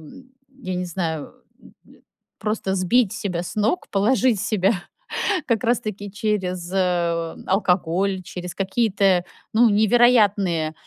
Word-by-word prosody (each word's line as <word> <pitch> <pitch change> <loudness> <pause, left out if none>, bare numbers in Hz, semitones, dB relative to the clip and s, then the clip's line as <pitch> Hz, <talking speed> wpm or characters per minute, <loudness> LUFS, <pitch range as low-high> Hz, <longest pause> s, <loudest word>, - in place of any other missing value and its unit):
м, 260 - -14 0.3
я 185 0 -3
не 180 - -2
знаю, 165 -3 -4 0.3
м, - - -17 0.7
просто 210 -3 -2
сбить 195 +4 +2
себя 195 -5 -3
с 175 - -7
ног, 215 - 0
положить 225 +2 +2
себя 200 0 +1 0.8
как 230 -4 +1
раз 235 0 +2
таки 205 -2 -6
через, 190 -4 -2
э, 170 -3 0
алкоголь, 185 0 +1
через 180 0 -7
какие-то, 195 -2 +1 0.3
ну, 230 +1 +5
невероятные, 205 -7 +3
195 Hz, 120 wpm, -22 LUFS, 180-215 Hz, 0.8 s, ну